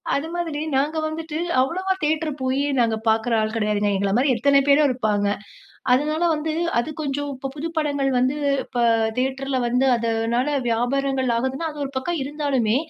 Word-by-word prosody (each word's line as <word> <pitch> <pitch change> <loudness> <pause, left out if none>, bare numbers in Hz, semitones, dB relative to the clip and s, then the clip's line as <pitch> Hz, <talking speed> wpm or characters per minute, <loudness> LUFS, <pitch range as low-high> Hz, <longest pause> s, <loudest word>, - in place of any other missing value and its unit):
அது 280 +3 -2
மாதிரி 330 -4 -2 0.2
நாங்க 290 +4 +1
வந்துட்டு 315 0 -4 0.2
அவ்வளவா 370 +8 0
தியேட்டர் 310 +1 0
போய் 260 +1 0 0.2
நாங்க 230 -2 +2
பார்க்ற 220 +2 +2
ஆள் 215 0 0
கெடையாதுங்க. 210 -2 +1
எங்கள 195 0 0
மாதிரி 260 +1 +3
எத்தன 280 +4 +4
பேரோ 285 +2 +5
இருப்பாங்க. 215 -5 0 0.7
அதனால 305 +6 +2
வந்து 310 +1 -2 0.3
அது 240 - -2
கொஞ்சம் 285 0 -2
இப்ப 270 +1 -5
புது 300 +3 -3
படங்கள் 285 -3 +1
வந்து, 255 +4 +1 0.3
இப்ப 240 - -3 0.4
தியேட்டர்ல 265 +1 -1
வந்து 250 +2 +2
அதனால, 230 +4 0
வியாபாரங்கள் 260 +2 0
ஆகுதுன்னா 265 +7 -2
அது 300 - -10
ஒரு 275 - -6
பக்கம் 335 +5 -2
இருந்தாலுமே, 275 -6 0
270 Hz, 160 wpm, -23 LUFS, 240-300 Hz, 0.7 s, பேரோ